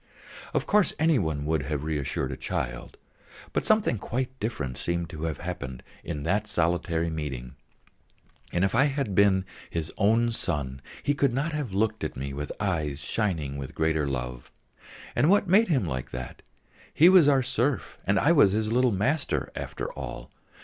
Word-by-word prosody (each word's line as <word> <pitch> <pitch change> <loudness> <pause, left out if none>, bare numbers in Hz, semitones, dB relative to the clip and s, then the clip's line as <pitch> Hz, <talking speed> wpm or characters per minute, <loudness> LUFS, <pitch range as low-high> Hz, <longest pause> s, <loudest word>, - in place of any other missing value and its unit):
Of - - +1
course 210 -2 +3
any 160 -2 +3
one 80 -5 -2
would 80 0 +1
have 70 +1 -3
reassured 75 -3 -2
a - - -3
child, - - -4 0.6
but - - 0
something 215 - +3
quite 125 +6 -2
different 75 - -3
seemed 85 -1 -2
to 80 0 -5
have 80 -2 -2
happened 70 -8 -6 0.2
in 75 - -4
that 100 +6 0
solitary 85 0 0
meeting; 65 -6 -5 1.0
and 90 +2 +2
if 95 - -1
I 135 +5 +5
had 135 -7 -1
been 95 -1 +4 0.2
his 80 -2 -3
own 115 +3 +3
son, 70 - -2 0.2
he 145 - +2
could 140 -3 +1
not 145 +6 -1
have 145 -7 -3
looked 110 +3 0
at - - -3
me 70 +1 -4
with 75 +1 -4
eyes 80 -8 -1
shining 80 -4 -1
with 65 - -7
greater 80 -2 +1
love. 60 -2 -4 0.7
And 150 - +3
what 200 0 +4
made 205 +6 +5
him 135 - +2
like 65 -6 -4
that? 65 0 -7 0.5
He 165 - +6
was 180 -5 +7
our 135 -2 +4
serf 130 0 -1
and 100 +1 +3
I 150 - +4
was 140 - +6
his 110 +1 0
little 125 +1 +4
master, 130 +10 0
after - - -5
all. - - -7
95 Hz, 175 wpm, -27 LUFS, -, 1.0 s, was